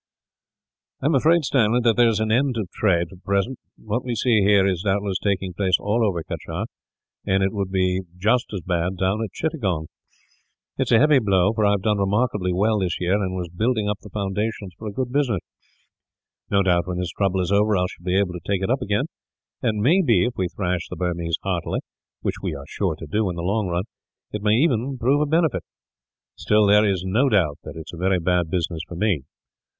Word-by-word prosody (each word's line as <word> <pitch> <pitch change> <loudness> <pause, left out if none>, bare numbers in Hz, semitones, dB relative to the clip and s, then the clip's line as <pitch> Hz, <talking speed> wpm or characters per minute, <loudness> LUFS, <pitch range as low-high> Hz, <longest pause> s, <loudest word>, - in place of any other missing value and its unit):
"I - - -2
am 155 - +3
afraid, 155 +4 +3
Stanley, 120 -3 +3
there 120 0 +4
is 110 -2 +1
an 110 0 0
end 130 +1 +2
of 100 -5 -3
trade, 85 -5 +1
for 95 - -13
the - - -24
present. 100 +6 -1 0.2
What 110 +3 -3
we 125 -2 -3
see 115 -1 +3
here 100 -1 +4
is, 95 -3 0
doubtless, 100 -1 0
taking 95 -2 -1
place 95 0 +2
all 110 +3 0
over 90 -6 0
Cachar; - - -5 0.6
and 95 0 +2
it 95 - 0
would 100 -3 -2
be 95 -1 +1 0.2
just 110 +6 +1
as 100 -4 -4
bad 90 +2 -1
down 95 +5 0
at 105 - -5
Chittagong. 95 - -2 0.9
It - - +1
is - - -3
a - - +7
heavy 150 +2 +5
blow, 100 -2 +2
for 110 -2 +2
I 100 - +4
have 100 -2 -1
done 105 -2 +1
remarkably 100 -1 +1
well 105 +4 +2
this 90 -2 -1
year, 90 +1 +1
and 95 -2 0
was 90 -2 -4
building 110 +4 0
up 105 0 -1
the 105 - -12
foundations 100 0 -3
for 110 - -8
a - - -3
good 125 +4 -3
business. 125 - +1 1.1
No 100 -1 +3
doubt, 90 -1 +2
when 90 -1 -3
this 90 -2 -2
trouble 95 +1 0
is 90 +1 -1
over. 105 0 +3
I 90 - +2
shall 90 - -9
be 90 +1 +1
able 100 -3 +1
to 90 - -5
take 95 0 -1
it 95 - 0
up 130 - +1
again; 105 +7 0 0.6
and 110 -4 0
it 105 - -1
may 170 - +5
be, 115 - +3
if 125 - -2
we 95 - 0
thrash 90 -1 -2
the - - -6
Burmese 85 -2 -1
heartily, 90 -3 -2 0.4
which - - -3
we - - -3
are 70 0 -8
sure 90 -2 -1
to 80 - -9
do 105 +6 0
in 90 - -4
the 85 - -4
long 100 +2 0
run, 90 +1 -1 0.5
it 105 - -4
may 105 0 +3
even 130 -1 +1
prove 135 +5 +2
a 150 - +1
benefit. 160 0 +2 0.7
Still, 105 0 +3
there 105 +1 +5
is 95 -2 -1
no 115 +9 +2
doubt 85 - +2
that - - -9
it 80 - -6
is - - -11
a - - -7
very 95 0 +2
bad 90 -1 +1
business 85 -1 -2
for 85 - -8
me. 90 -4 +1
100 Hz, 230 wpm, -23 LUFS, 90-110 Hz, 1.1 s, a